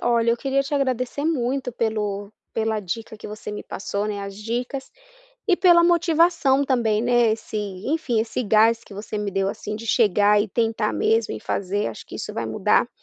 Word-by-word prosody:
Olha, 235 Hz, -1 st, +2 dB
eu 235 Hz, -, +2 dB
queria 275 Hz, +2 st, 0 dB
te 275 Hz, -, -8 dB
agradecer 260 Hz, +1 st, -1 dB
muito 260 Hz, -4 st, -1 dB
pelo 210 Hz, -3 st, -2 dB, 0.2 s
pela 220 Hz, -1 st, 0 dB
dica 220 Hz, +3 st, -5 dB
que -, -, -9 dB
você 210 Hz, 0 st, -7 dB
me 210 Hz, -, -6 dB
passou, 200 Hz, +1 st, -3 dB
né, 205 Hz, -1 st, -3 dB
as 200 Hz, 0 st, -7 dB
dicas, 245 Hz, +5 st, -4 dB, 0.6 s
e 370 Hz, -, +4 dB
pela 345 Hz, -2 st, +6 dB
motivação 335 Hz, -5 st, +3 dB
também, 230 Hz, -6 st, +1 dB
né, 240 Hz, -1 st, +3 dB
esse, 220 Hz, 0 st, -4 dB, 0.3 s
enfim, 285 Hz, -6 st, 0 dB
esse 230 Hz, +2 st, -2 dB
gás 225 Hz, +1 st, +4 dB
que -, -, -15 dB
você 205 Hz, +2 st, -6 dB
me 210 Hz, -1 st, -2 dB
deu, 195 Hz, 0 st, 0 dB
assim, 210 Hz, 0 st, -5 dB
de 230 Hz, +1 st, -8 dB
chegar 210 Hz, -2 st, +4 dB
e 210 Hz, -, -5 dB
tentar 225 Hz, 0 st, 0 dB
mesmo 225 Hz, 0 st, +1 dB
e -, -, -4 dB
fazer. 200 Hz, +2 st, -2 dB
Acho 115 Hz, -, -6 dB
que -, -, -9 dB
isso -, -, -6 dB
vai -, -, -2 dB
mudar -, -, +2 dB
225 Hz, 195 wpm, -23 LUFS, 210-265 Hz, 0.6 s, pela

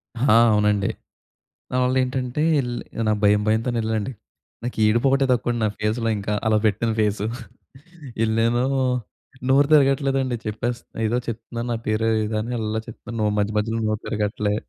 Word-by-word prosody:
ఆ! 120 Hz, -1 st, +3 dB, 0.2 s
అవునండి. 105 Hz, -1 st, +2 dB, 0.8 s
దాని 125 Hz, 0 st, 0 dB
వల్ల 130 Hz, +1 st, +1 dB
ఏంటంటే 130 Hz, +2 st, -2 dB, 0.2 s
ఎళ్ 120 Hz, -2 st, -3 dB, 0.4 s
నా -, -, +4 dB
భయం, 105 Hz, 0 st, +4 dB
భయంతోనే 115 Hz, +2 st, +1 dB
ఎళ్ళండి. 110 Hz, +3 st, -2 dB, 0.5 s
నాకు 120 Hz, -1 st, -5 dB
ఏడుపొకటే 135 Hz, +5 st, +3 dB
తక్కువండి. 120 Hz, -1 st, 0 dB
నా -, -, +3 dB
ఫేస్‌లో 110 Hz, +2 st, 0 dB
ఇంక. 100 Hz, -, -8 dB, 0.2 s
అలా 110 Hz, -1 st, +4 dB
పెట్టాను 110 Hz, +2 st, 0 dB
ఫేసు. 105 Hz, 0 st, 0 dB, 1.0 s
ఎళ్ళానూ, 115 Hz, +2 st, +1 dB, 0.9 s
నోరు 140 Hz, +1 st, +5 dB
తిరగట్లేదండి 135 Hz, -3 st, +3 dB
చెప్పేస్ 115 Hz, +3 st, -3 dB, 0.2 s
ఏదో 120 Hz, +3 st, +1 dB
చెప్తున్నాను. 115 Hz, +1 st, -5 dB
నా 115 Hz, -, -1 dB
పేరు 110 Hz, +1 st, +1 dB, 0.2 s
ఏదో 110 Hz, 0 st, -2 dB
అని 120 Hz, +3 st, -4 dB
అళ్ళా 110 Hz, 0 st, -2 dB
చెప్తున్నాను. 115 Hz, -2 st, -4 dB
మధ్య 105 Hz, +1 st, 0 dB
మధ్యలో 115 Hz, +2 st, -2 dB
నోరు 110 Hz, 0 st, -1 dB
తిరగట్లే. 105 Hz, 0 st, -1 dB
115 Hz, 145 wpm, -23 LUFS, 110-125 Hz, 1.0 s, నోరు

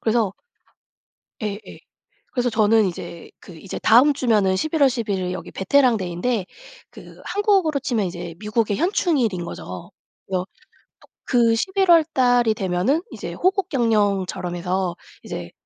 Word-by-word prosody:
그래서 220 Hz, -3 st, +1 dB, 1.1 s
예예. 210 Hz, 0 st, -6 dB, 0.5 s
그래서 245 Hz, -1 st, 0 dB
저는 220 Hz, -1 st, +3 dB
이제 170 Hz, -1 st, -7 dB
그 180 Hz, -, -13 dB
이제 180 Hz, +4 st, -7 dB
다음 255 Hz, +6 st, +5 dB
주면은 215 Hz, -8 st, +2 dB
11 310 Hz, -, -2 dB
월 270 Hz, -, +6 dB
11 220 Hz, -6 st, -2 dB
일 180 Hz, 0 st, -3 dB
여기 -, -, -7 dB
베테랑 250 Hz, +4 st, +3 dB
데이인데 185 Hz, +3 st, -2 dB, 0.4 s
그 -, -, -14 dB
한국으로 390 Hz, -8 st, +1 dB
치면 230 Hz, -7 st, -1 dB
이제 175 Hz, -1 st, -6 dB
미국의 210 Hz, 0 st, -1 dB
현충일인 285 Hz, -, 0 dB
거죠. 90 Hz, -, -8 dB, 0.4 s
그래서 185 Hz, -1 st, -2 dB, 0.8 s
그 230 Hz, -2 st, +3 dB
11 380 Hz, -, 0 dB
월달이 250 Hz, -9 st, +3 dB
되면은 195 Hz, -, 0 dB
이제 -, -, -7 dB
호국 380 Hz, +1 st, 0 dB
경영처럼 205 Hz, -7 st, 0 dB
해서 180 Hz, 0 st, -2 dB, 0.3 s
이제 85 Hz, -1 st, -7 dB
220 Hz, 270 characters per minute, -22 LUFS, 185-270 Hz, 1.1 s, 월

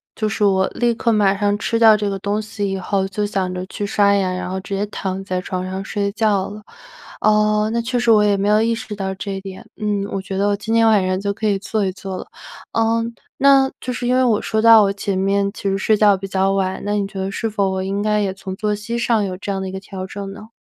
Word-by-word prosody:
就 215 Hz, -, -1 dB
是 215 Hz, 0 st, -2 dB
我 190 Hz, -2 st, +3 dB
立 240 Hz, -1 st, 0 dB
刻 230 Hz, 0 st, 0 dB
马 205 Hz, -3 st, +3 dB
上 205 Hz, 0 st, +1 dB
吃 230 Hz, -, 0 dB
掉 220 Hz, -2 st, +7 dB
这 205 Hz, -1 st, -1 dB
个 195 Hz, -, -3 dB
东 205 Hz, +2 st, -1 dB
西 210 Hz, -2 st, -4 dB
以 195 Hz, -, -2 dB
后 190 Hz, +1 st, -1 dB
就 205 Hz, +2 st, -2 dB
想 190 Hz, -3 st, -2 dB
着 180 Hz, 0 st, -4 dB
去 205 Hz, -, -4 dB
刷 200 Hz, 0 st, +3 dB
牙， 190 Hz, -2 st, +1 dB
然 185 Hz, 0 st, -4 dB
后 190 Hz, -, -3 dB
直 195 Hz, +1 st, -5 dB
接 200 Hz, +1 st, -1 dB
躺 190 Hz, -2 st, -4 dB
在 185 Hz, -1 st, -2 dB
床 185 Hz, 0 st, -4 dB
上 190 Hz, +1 st, -4 dB
睡 200 Hz, 0 st, -2 dB
觉 205 Hz, -3 st, +1 dB
了。 210 Hz, +1 st, -9 dB, 0.6 s
呃， 210 Hz, 0 st, +3 dB
那 235 Hz, +1 st, 0 dB
确 245 Hz, +1 st, -1 dB
实 240 Hz, -, 0 dB
我 210 Hz, -1 st, +6 dB
也 205 Hz, -1 st, +3 dB
没 200 Hz, -, 0 dB
有 210 Hz, +1 st, +4 dB
意 230 Hz, +1 st, +2 dB
识 225 Hz, -2 st, -6 dB
到 190 Hz, -1 st, -3 dB
这 195 Hz, +1 st, -5 dB
一 195 Hz, -, -5 dB
点。 195 Hz, +2 st, -9 dB
嗯， 210 Hz, -2 st, -1 dB
我 195 Hz, -, -2 dB
觉 190 Hz, 0 st, -5 dB
得 200 Hz, -, +2 dB
我 205 Hz, -, +2 dB
今 215 Hz, +3 st, -4 dB
天 230 Hz, 0 st, +4 dB
晚 210 Hz, -4 st, +4 dB
上 185 Hz, 0 st, 0 dB
就 200 Hz, 0 st, -2 dB
可 220 Hz, +1 st, -5 dB
以 200 Hz, -2 st, +1 dB
做 210 Hz, +1 st, -1 dB
一 190 Hz, -, 0 dB
做 190 Hz, 0 st, -7 dB
了。 -, -, -7 dB, 0.5 s
呃， 230 Hz, 0 st, +2 dB, 0.3 s
那 275 Hz, -1 st, +5 dB
就 255 Hz, -, -4 dB
是 245 Hz, 0 st, -3 dB
因 250 Hz, -, +2 dB
为 260 Hz, -, +3 dB
我 225 Hz, -4 st, +2 dB
说 220 Hz, 0 st, -1 dB
到 225 Hz, -1 st, +8 dB
我 195 Hz, -, +2 dB
前 200 Hz, -1 st, -2 dB
面 200 Hz, +1 st, +1 dB
其 200 Hz, -, -3 dB
实 195 Hz, -, 0 dB
睡 215 Hz, +3 st, +2 dB
觉 205 Hz, -1 st, +5 dB
比 195 Hz, +1 st, -6 dB
较 190 Hz, 0 st, +1 dB
晚， 190 Hz, -1 st, -1 dB
那 205 Hz, -, -1 dB
你 205 Hz, -1 st, 0 dB
觉 195 Hz, -1 st, -8 dB
得 190 Hz, 0 st, -2 dB
是 225 Hz, +2 st, -2 dB
否 200 Hz, -2 st, 0 dB
我 190 Hz, 0 st, -2 dB
应 195 Hz, +1 st, -2 dB
该 210 Hz, 0 st, +1 dB
也 195 Hz, -2 st, -1 dB
从 190 Hz, -1 st, -7 dB
作 210 Hz, +1 st, -1 dB
息 225 Hz, +3 st, -4 dB
上 235 Hz, -2 st, +1 dB
有 185 Hz, -1 st, -4 dB
这 200 Hz, -, -4 dB
样 195 Hz, -1 st, -2 dB
的 190 Hz, -, -4 dB
一 -, -, -6 dB
个 190 Hz, -, -5 dB
调 190 Hz, -1 st, -7 dB
整 195 Hz, 0 st, -6 dB
呢？ 210 Hz, +2 st, -11 dB
200 Hz, 305 characters per minute, -20 LUFS, 195-215 Hz, 0.6 s, 到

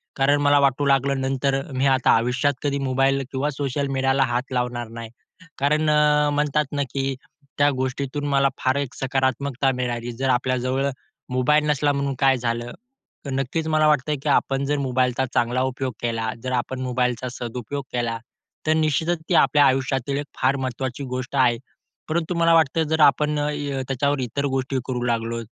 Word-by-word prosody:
कारण 140 Hz, +1 st, +2 dB
मला 145 Hz, 0 st, +4 dB
वाटू 140 Hz, 0 st, +2 dB
लागलं 135 Hz, 0 st, +2 dB
नंतर 135 Hz, +1 st, 0 dB, 0.2 s
मी 130 Hz, +1 st, 0 dB
आता 130 Hz, -1 st, +3 dB
आयुष्यात 125 Hz, +5 st, +1 dB
कधी 140 Hz, -1 st, 0 dB
मोबाईल 135 Hz, 0 st, +1 dB
किंवा 135 Hz, +2 st, -1 dB
सोशल 140 Hz, 0 st, -2 dB
मीडियाला 135 Hz, 0 st, +2 dB
हात 125 Hz, +1 st, -2 dB
लावणार 125 Hz, -1 st, -2 dB
नाही. 115 Hz, 0 st, -8 dB, 0.5 s
कारण 150 Hz, +3 st, +2 dB
अ, 150 Hz, 0 st, +4 dB
म्हणतात 150 Hz, +1 st, +1 dB
ना, 145 Hz, -1 st, 0 dB
की 135 Hz, -1 st, -1 dB, 0.4 s
त्या 145 Hz, 0 st, +4 dB
गोष्टीतून 130 Hz, +2 st, -3 dB
मला 140 Hz, -1 st, +3 dB
फार 130 Hz, 0 st, +1 dB
एक 140 Hz, -3 st, -3 dB
सकारात्मकता 135 Hz, 0 st, 0 dB
मिळाली 120 Hz, -1 st, -3 dB
जर 130 Hz, +3 st, -2 dB
आपल्याजवळ 130 Hz, +2 st, 0 dB, 0.4 s
मोबाईल 130 Hz, +4 st, +2 dB
नसला 145 Hz, 0 st, +2 dB
म्हणून 140 Hz, -1 st, -1 dB
काय 135 Hz, -1 st, +4 dB
झालं? 120 Hz, 0 st, -3 dB, 0.6 s
नक्कीच 135 Hz, +4 st, -2 dB
मला 155 Hz, -1 st, +3 dB
वाटतंय 150 Hz, 0 st, +2 dB
की 150 Hz, -, -1 dB
आपण 135 Hz, -1 st, +1 dB
जर 145 Hz, +1 st, 0 dB
मोबाईलचा 130 Hz, -1 st, 0 dB
चांगला 120 Hz, +2 st, +1 dB
उपयोग 130 Hz, 0 st, -3 dB
केला, 115 Hz, -1 st, -1 dB
जर 130 Hz, -, -3 dB
आपण 130 Hz, +1 st, -2 dB
मोबाईलचा 125 Hz, -1 st, -1 dB
सदुपयोग 125 Hz, +3 st, -5 dB
केला 120 Hz, -2 st, -1 dB, 0.5 s
तर 155 Hz, -, +4 dB
निश्चितच 160 Hz, +2 st, +1 dB
ती 180 Hz, -, +3 dB
आपल्या 145 Hz, -2 st, +5 dB
आयुष्यातील 135 Hz, 0 st, 0 dB
एक 145 Hz, -, -3 dB, 0.2 s
फार 130 Hz, +2 st, +3 dB
महत्त्वाची 130 Hz, 0 st, -4 dB
गोष्ट 130 Hz, +1 st, -5 dB
आहे 125 Hz, -3 st, +3 dB, 0.5 s
परंतु 170 Hz, +2 st, -1 dB
मला 165 Hz, 0 st, +4 dB
वाटतं 160 Hz, 0 st, +3 dB
जर 160 Hz, +1 st, 0 dB
य -, -, +8 dB
आपण 150 Hz, +2 st, +3 dB, 0.5 s
त्याच्यावर 140 Hz, +1 st, 0 dB
इतर 130 Hz, +3 st, -2 dB
गोष्टी 135 Hz, -1 st, -1 dB
करू 125 Hz, -2 st, -2 dB
लागलो. 115 Hz, -1 st, -1 dB
135 Hz, 165 wpm, -23 LUFS, 125-145 Hz, 0.6 s, य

